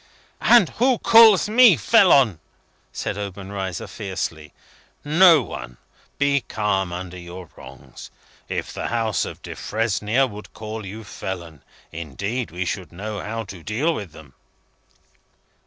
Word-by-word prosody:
"And 235 -8 +5
who 255 -1 +4
calls 225 -4 +6
me 220 - +6
felon?" 125 - +4 0.5
said 105 - -4
Obenreizer, 95 -2 -5
fiercely. 85 -7 -5 0.5
"No 160 -1 +6
one. - - -8 0.4
Be 140 0 +2
calm 100 -5 -2
under 90 0 -7
your 90 0 -10
wrongs. 65 0 -13 0.4
If - - -4
the - - -4
House 115 -2 -1
of - - -9
Defresnier 110 +3 -1
would 105 -4 -10
call 110 -1 -7
you 110 +3 -8
felon, 85 -7 -7 0.3
indeed, 100 - -4
we 90 +3 -4
should 95 -1 -4
know 105 +4 -6
how 115 +1 -4
to 95 -4 -11
deal 130 - -1
with 100 - -6
them." 75 -3 -15
105 Hz, 125 wpm, -22 LUFS, 90-130 Hz, 0.5 s, calls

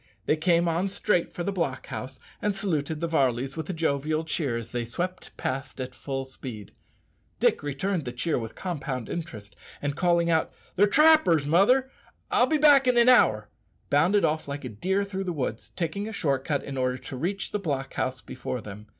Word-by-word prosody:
They - - +3
came 170 +1 +2
on 170 +4 0
straight 200 -2 0
for 175 - -4
the 200 - -1
block 165 -9 -2
house, 130 +2 -6 0.2
and 205 -1 0
saluted 160 -6 -2
the 170 - 0
Varleys 135 -4 +1
with 160 0 -5
a - - -1
jovial 155 -1 0
cheer 145 -6 -1
as 115 -1 -7
they 120 -1 -2
swept 175 +11 -5
past 135 +1 -4
at 130 0 -4
full 135 0 -4
speed. 125 -6 -9 0.7
Dick - - +3
returned 145 +4 -2
the 125 - -3
cheer 140 +4 -1
with 115 -1 -7
compound 140 - -4
interest, 110 -12 -6 0.2
and 145 -1 -2
calling 170 -1 +2
out, 160 -1 +1 0.2
"They're 205 +3 +5
trappers, 300 - +5
mother; 250 - +4 0.4
I'll - - +4
be 310 - +2
back 285 -3 +6
in 250 -1 +4
an 240 +1 +6
hour," 105 - +4 0.4
bounded 175 +8 +4
off 155 0 -1
like 140 -1 -5
a - - -4
deer 190 - 0
through 195 -1 -4
the 180 - -2
woods, 125 -7 -3
taking 180 +5 -2
a 220 - -6
short 140 -8 0
cut 145 -2 -1
in 135 -1 -6
order 130 0 0
to 130 +1 -8
reach 190 +9 -2
the 210 - -1
block 140 -7 -3
house 130 0 -2
before 125 - -5
them. 105 0 -10
155 Hz, 200 wpm, -27 LUFS, 130-185 Hz, 0.7 s, back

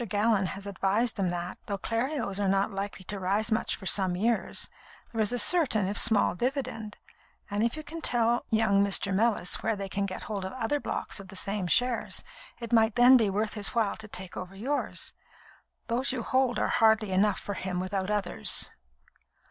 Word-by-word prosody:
Gallon 205 -1 +2
has 195 +1 -7
advised 200 +4 0
them 190 -3 0
that, 175 0 -5
though 200 -2 -2
Clerios 230 0 -2
are 200 - +1
not 195 +2 +1
likely 195 -1 -5
to 205 +1 -4
rise 200 +5 0
much 220 - 0
for 195 - -12
some 185 -1 +3
years, 225 +5 0 0.4
there 225 - -1
is 215 - +1
a 245 - -1
certain, 250 - +3
if 200 - -3
small, 220 -5 +5
dividend; 230 -1 -3 0.5
and 205 +1 0
if 235 +6 0
you 310 - -6
can 330 +2 -8
tell 240 -3 +3
young 215 -3 +3
Mr. 200 0 +2
Mellis 210 -3 +1
where 225 0 0
they 195 -1 -5
can 200 +1 -2
get 185 - -6
hold 205 -3 -4
of 190 - -5
other 260 +3 -1
blocks - - -4
of 195 - -10
the 195 - -12
same 195 0 -2
shares, 245 +3 +1 0.4
it 235 0 -6
might 220 -1 +4
then 245 +2 +7
be 225 -5 +4
worth 210 +2 -1
his 210 +3 -2
while 225 -3 +1
to 220 - -8
take 190 -3 -7
over 185 +1 -7
yours. 270 +9 -2 0.7
Those 245 +4 +1
you 250 -3 -3
hold 255 0 +1
are - - 0
hardly 220 -2 +3
enough 195 +2 +2
for 205 - -4
him 185 -1 -3
without 190 +1 -2
others." 205 -4 +1
210 Hz, 195 wpm, -28 LUFS, 195-235 Hz, 0.7 s, then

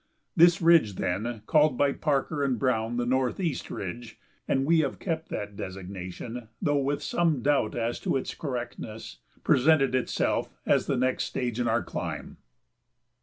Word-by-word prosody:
This 170 0 +5
ridge, 165 - +5
then, 105 +6 -2
called 150 -2 +3
by 140 -1 +3
Parker 145 0 0
and 130 -3 +1
Browne 120 -2 0
the 120 - 0
Northeast 130 +7 -1
Ridge 110 +4 -6 0.3
(and 135 0 +1
we 165 +2 +4
have 140 -4 0
kept 165 -3 -3
that 105 0 -5
designation, 95 +5 -7
though 145 -1 +1
with 140 +1 -1
some 160 -8 +1
doubt 140 -6 +2
as 120 0 -2
to - - 0
its 130 - -4
correctness), 120 - -6 0.3
presented 135 -1 +4
itself 130 -1 0 0.2
as - - +2
the 135 - +1
next 130 +1 +1
stage 120 -2 -3
in 120 - +1
our 115 +1 +1
climb. - - -5
125 Hz, 155 wpm, -27 LUFS, 115-145 Hz, 0.3 s, This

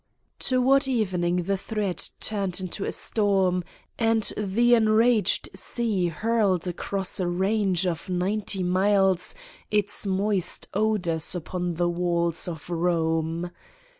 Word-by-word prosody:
Toward 270 +2 +3
evening 180 -8 0
the 195 +2 0
threat 205 -2 -2
turned 195 -4 -2
into 185 +2 -3
a - - -2
storm 190 -4 +1 0.4
and 225 -1 +2
the 215 +4 +2
enraged 225 0 +3
sea 215 -7 -1
hurled 195 0 0
across 190 +3 -2
a 180 - 0
range 190 0 +1
of 175 0 -3
ninety 190 +2 -1
miles 190 0 +2 0.3
its 205 0 0
moist 195 -1 -1
odors 190 -7 0
upon 175 0 -3
the 175 +1 +1
walls 170 -1 0
of 160 -4 -6
Kome. 165 0 -1
190 Hz, 115 wpm, -25 LUFS, 175-215 Hz, 0.4 s, Toward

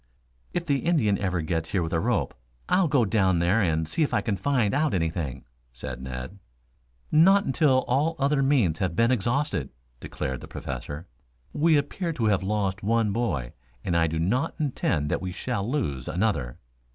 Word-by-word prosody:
"If 175 -1 -2
the 140 -4 +1
Indian 130 - +2
ever 90 -3 -1
gets 80 0 -2
here 95 -4 +2
with 80 - -4
a 80 - +2
rope, - - 0 0.3
I'll 185 -1 +3
go 140 -6 +3
down 95 -4 +2
there 90 +6 +2
and 80 -4 +1
see 165 - -2
if 150 - +1
I - - +2
can 105 - -1
find 115 0 +1
out 150 -4 +1
anything," 80 -5 -2 0.3
said 65 0 -7
Ned. 65 +9 -7 0.7
"Not 190 +6 +5
until 135 -2 +2
all 150 +6 +1
other 140 0 +2
means 125 - +2
have 90 -3 -1
been 115 +6 +3
exhausted," 120 - 0 0.3
declared 65 -1 -4
the - - -9
Professor. 70 +5 -6 0.5
"We 155 +1 +4
appear 170 +4 -2
to 120 -7 -1
have 100 -4 +2
lost 100 0 -1
one 110 0 +1
boy, 75 - -2 0.3
and 85 - -1
I 85 -1 +3
do 80 +1 -3
not 120 - 0
intend 90 - 0
that - - 0
we 90 -1 -4
shall 105 +2 -3
lose 70 - -2
another." 75 - -1
100 Hz, 180 wpm, -26 LUFS, 80-140 Hz, 0.7 s, Not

